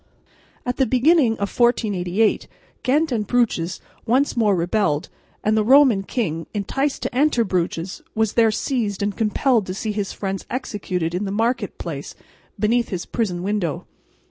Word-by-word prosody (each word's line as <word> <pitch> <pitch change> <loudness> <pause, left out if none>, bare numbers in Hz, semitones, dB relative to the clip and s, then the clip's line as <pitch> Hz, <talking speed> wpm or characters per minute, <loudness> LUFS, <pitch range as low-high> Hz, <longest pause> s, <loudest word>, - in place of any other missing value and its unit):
At 250 0 -2
the 265 - +2
beginning 260 -1 +4
of 200 -2 -4
1488 215 -4 +1 0.3
Ghent 300 +4 +1
and 215 -4 -1
Bruges 200 -8 0 0.3
once 260 +5 +2
more 215 -4 +3
rebelled; 175 -2 0 0.3
and 215 +1 +2
the 215 - +3
Roman 260 -3 +6
king, 165 -7 -3
enticed 270 +8 -1
to - - -3
enter 275 -3 +3
Bruges, 180 -2 -2
was 220 -1 +1
there 230 -1 +4
seized 215 -3 -1
and 205 0 -1
compelled 225 0 +1
to 185 - -4
see 215 +2 -2
his 205 -2 -3
friends 195 -1 -4
executed 185 -9 -3
in 185 +4 -1
the 195 - -3
market 225 0 -1
place 145 -5 -6 0.4
beneath 230 +3 +2
his 180 -3 -4
prison 180 -7 -2
window. 195 -6 -2
215 Hz, 155 wpm, -22 LUFS, 190-245 Hz, 0.4 s, Roman